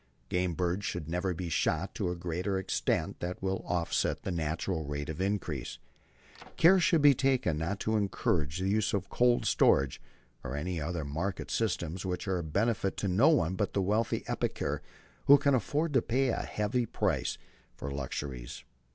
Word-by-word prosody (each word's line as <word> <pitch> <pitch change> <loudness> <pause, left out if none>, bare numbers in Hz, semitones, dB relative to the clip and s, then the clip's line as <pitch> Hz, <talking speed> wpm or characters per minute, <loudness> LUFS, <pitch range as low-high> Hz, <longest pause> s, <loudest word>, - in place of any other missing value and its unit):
Game 90 -1 0
birds 90 +3 -1
should 85 -5 -3
never 90 +3 -1
be 90 +1 -4
shot 80 - 0
to - - -1
a 90 - -2
greater 90 +3 -2
extent 95 - -1
than 90 +1 -3
will 95 0 -2
offset 85 -2 0
the 95 - -2
natural 80 +1 -2
rate 75 0 -4
of 80 +3 -4
increase.... 95 -9 -2 0.8
Care 185 +3 +7
should 165 -3 +3
be 145 -1 +8
taken 130 - +1
not 95 +5 -2
to 110 - 0
encourage 85 -7 0
the 95 +1 -1
use 105 +2 +1
of 100 -1 -3
cold 120 0 +3
storage 70 -2 +3 0.4
or 65 +4 -4
other 85 0 -3
market 80 +6 -3
systems 90 +4 -1
which 90 +1 -3
are 95 -2 0
a - - -3
benefit 100 +4 0
to 100 - -1
no 105 - +5
one 95 - +3
but 100 +1 -1
the 100 - +1
wealthy 105 +4 0
epicure - - -2 0.4
who 140 - +9
can 140 0 +2
afford 145 +6 0
to 130 - +4
pay 130 +3 +1
a - - 0
heavy 110 +3 -1
price - - -1 0.4
for 70 - -6
luxuries. 65 -2 -5
95 Hz, 175 wpm, -30 LUFS, 80-105 Hz, 0.8 s, who